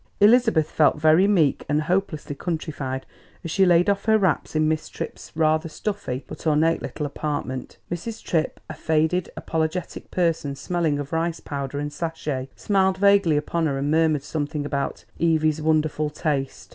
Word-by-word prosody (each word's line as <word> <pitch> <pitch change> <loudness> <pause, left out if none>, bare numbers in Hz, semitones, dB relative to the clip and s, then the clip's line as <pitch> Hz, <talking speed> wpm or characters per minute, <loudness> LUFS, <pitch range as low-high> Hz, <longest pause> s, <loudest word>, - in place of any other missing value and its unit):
Elizabeth 220 -7 +5
felt 150 0 +3
very 160 +5 +5
meek 165 -9 +2
and 150 +1 +2
hopelessly 175 -3 -1
countrified 145 -4 -4 0.4
as 165 - -4
she 190 +2 +4
laid 175 0 +5
off 200 -1 +1
her 220 0 +5
wraps 190 -6 0
in 155 0 +3
Miss 155 0 -1
Tripp's - - -7
rather 155 0 +2
stuffy 175 -8 -4
but - - -7
ornate 160 +2 +3
little 150 - -4
apartment. 145 -3 -4
Mrs. 215 +6 -5
Tripp, 160 -2 -1
a - - -6
faded, 160 +3 0
apologetic 160 +2 -3
person 165 -5 0
smelling 165 -1 -1
of 145 +2 -5
rice 165 0 0
powder 140 -1 -5
and 145 0 -3
sachet, 150 -4 -3
smiled 190 -2 +1
vaguely 200 -5 +4
upon 160 +2 0
her 140 -2 -1
and 140 +2 -1
murmured 155 -3 +2
something 145 -1 -3
about 140 -1 -3
"Evy's 155 -2 +2
wonderful 155 -1 +1
taste!" 145 -3 -3
155 Hz, 160 wpm, -24 LUFS, 150-175 Hz, 0.4 s, Elizabeth